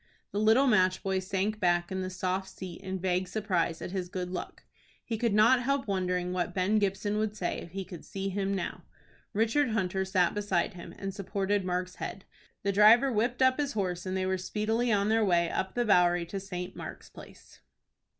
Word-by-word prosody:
The 205 - -2
little 220 +6 +5
match 185 -7 +3
boy 190 -1 0
sank 195 +3 -2
back 175 -1 +1
in 190 0 -2
the 185 - -3
soft 185 +1 -2
seat 185 -2 -8
in 190 0 -4
vague 185 0 0
surprise 180 -5 -1
at - - -5
his 185 -2 -3
good 180 -1 -4
luck. 185 - -6 0.4
He 230 - -2
could 225 -2 0
not 230 +4 +5
help 275 +1 0
wondering 180 -2 -1
what 175 -1 -2
Ben 195 +3 +2
Gibson 205 +1 0
would 215 -1 -1
say 180 - -2
if - - -9
he 190 +2 -5
could 175 -2 -10
see 195 0 -4
him 195 0 -1
now. 190 - -4 0.5
Richard 230 +6 +2
Hunter 190 -3 0
sat 185 -2 +2
beside 205 -4 0
him, 175 -1 -9
and 195 -1 -4
supported 200 +1 -1
Mark's 180 0 -2
head. 195 - -6 0.4
The 200 - +1
driver 225 +7 +6
whipped 240 +3 +1
up 260 +2 +4
his 285 -1 -1
horse, 185 -3 -2
and 185 0 -1
they 185 - 0
were 190 0 0
speedily 220 +5 0
on 205 0 +2
their 225 0 +3
way 175 -4 +2
up 190 - -2
the 240 0 +1
Bowery 175 -4 +4
to 195 - -3
St. 180 -2 -6
Mark's - - -9
Place. - - -14
195 Hz, 205 wpm, -29 LUFS, 180-215 Hz, 0.5 s, driver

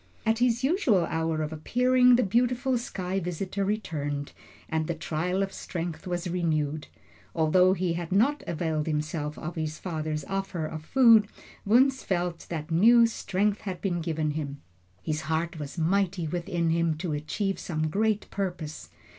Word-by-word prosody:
At 225 0 +2
his 245 0 +2
usual 265 - +3
hour 160 -1 -1
of 155 +1 -4
appearing, 250 +9 +4
the 250 - +3
beautiful 245 +5 +1
sky 190 -5 -3
visitor 185 +3 -3
returned, 145 -9 -2 0.4
and 160 -1 -1
the 170 - -2
trial 175 +4 -1
of 195 - -4
strength 170 0 -5
was 175 0 -2
renewed. 155 -4 -1 0.5
Although 180 +3 +4
he 180 -2 0
had 170 0 -5
not 250 +10 +3
availed 160 -2 -1
himself 150 0 -2
of 170 +3 -5
his 155 -2 -3
father's 155 -4 -3
offer 195 -3 -3
of 155 0 -6
food, 230 0 +6 0.4
Wunzh 260 +5 +4
felt 175 -2 -2
that 160 -1 -5
new 230 +8 +6
strength 210 -2 -1
had 185 -4 -5
been 175 -3 -1
given 160 -2 -1
him. 145 -2 -4 0.4
His 155 0 -2
heart 160 +1 -1
was 145 +3 -7
mighty 180 +1 +1
within 170 0 -1
him 165 -1 +1
to 165 -1 -3
achieve 195 +7 -2
some 155 -2 -2
great 210 +5 0
purpose. 175 -6 -4
175 Hz, 155 wpm, -27 LUFS, 155-200 Hz, 0.5 s, food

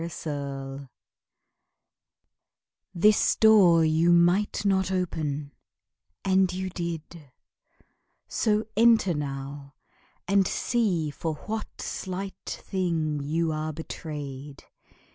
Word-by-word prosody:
VI 165 - -3
Bluebeard 140 -4 -6 2.1
This 210 +5 +4
door 190 -7 +6
you 160 +2 +3
might 175 +5 +3
not 190 -1 +2
open, 155 -6 -2 0.7
and 190 -1 +3
you 185 +1 -4
did; 170 -4 -6 1.0
So 215 -1 +1
enter 225 -5 +5
now, 140 -1 -6 0.5
and 195 0 +3
see 185 -11 0
for 160 +1 -3
what 220 0 -5
slight 190 +1 -5 0.2
thing 165 -6 -1
You 160 +3 0
are 155 0 -2
betrayed. 145 -3 -7
170 Hz, 90 wpm, -26 LUFS, 150-190 Hz, 2.1 s, door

